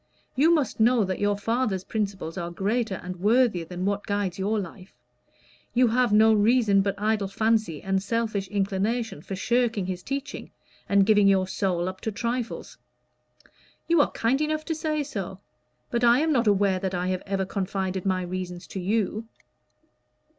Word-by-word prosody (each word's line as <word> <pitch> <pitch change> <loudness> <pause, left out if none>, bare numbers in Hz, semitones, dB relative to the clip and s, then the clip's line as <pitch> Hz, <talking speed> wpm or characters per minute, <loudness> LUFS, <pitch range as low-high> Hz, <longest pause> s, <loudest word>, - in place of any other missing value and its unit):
You 300 +6 +4
must 300 -9 +1
know 230 0 +4
that 185 -1 -3
your 205 0 +1
father's 220 -3 -1
principles 195 -6 -3
are 175 -2 -4
greater 205 +4 -1
and 180 0 -6
worthier 210 -2 +2
than 180 +2 -5
what 200 +1 -1
guides 200 -3 -2
your 210 +3 0
life. 185 0 -9 0.8
You 245 -1 +4
have 245 0 +2
no 220 +1 +6
reason 215 -1 +4
but 200 0 -1
idle 210 -1 0
fancy 215 -5 0
and 195 0 0
selfish 215 -2 -1
inclination 200 0 -1
for 195 - -6
shirking 230 -1 0
his 180 -1 -4
teaching 275 +6 -5 0.4
and 200 -1 +4
giving 205 -1 +5
your 190 -1 +3
soul 185 -2 -1
up 185 0 -6
to 220 - -2
trifles." 240 - -4 1.1
"You 335 -2 +5
are - - +2
kind 250 +5 0
enough 310 0 -1
to 330 - -1
say 310 -1 -1
so. 195 -8 -6 0.5
But 235 0 0
I 240 0 +6
am 320 0 +1
not 240 -6 +2
aware 200 -2 +3
that 190 -1 -2
I 180 +1 -1
have 185 -1 -1
ever 195 -1 -1
confided 190 -1 -3
my 185 -2 0
reasons 180 0 -5
to 195 - -5
you." 215 +3 -1
205 Hz, 170 wpm, -26 LUFS, 190-235 Hz, 1.1 s, no